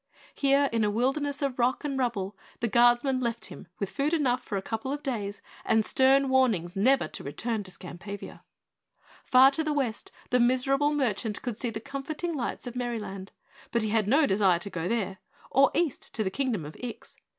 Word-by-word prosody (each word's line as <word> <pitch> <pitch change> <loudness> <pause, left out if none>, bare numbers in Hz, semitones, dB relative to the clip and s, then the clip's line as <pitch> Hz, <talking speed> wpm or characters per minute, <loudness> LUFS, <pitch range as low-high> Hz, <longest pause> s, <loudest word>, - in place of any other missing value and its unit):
Here, 280 0 +3
in 225 -1 +2
a 210 - +2
wilderness 275 +6 0
of 265 -2 -2
rock 245 +2 +1
and 290 -2 -2
rubble, 215 -7 -1 0.2
the 235 - 0
guardsmen 240 +4 +4
left 235 -2 -2
him - - -9
with 200 - -3
food 290 +4 0
enough 255 -5 +1
for 205 - -3
a - - -2
couple 225 +5 -3
of 290 +1 -4
days 210 -7 -3 0.2
and 220 -1 +2
stern 270 +3 +4
warnings 225 -10 +2
never 260 +7 +3
to - - -7
return 215 - -2
to 190 - -10
Skampavia. 185 +3 -8 0.8
Far 260 +1 +7
to 320 +3 -1
the 305 -1 0
west 255 -7 -2 0.2
the 250 - +4
miserable 270 +4 +3
merchant 230 -7 -1
could 240 -4 -4
see 245 - -1
the 220 -1 -5
comforting 280 +7 -4
lights 265 -3 -3
of 245 0 -6
Merryland, 210 -6 -4 0.4
but 235 -2 +1
he 215 - 0
had 215 -1 +1
no 285 +7 +5
desire 190 -4 +3
to 185 +4 -7
go 165 0 -3
there 195 -4 -1 0.3
or 275 +1 +5
east 330 -6 -1
to 220 - 0
the 190 - -2
Kingdom 235 - -1
of 150 - -9
Ix. 245 -2 -8
240 Hz, 195 wpm, -28 LUFS, 210-275 Hz, 0.8 s, Far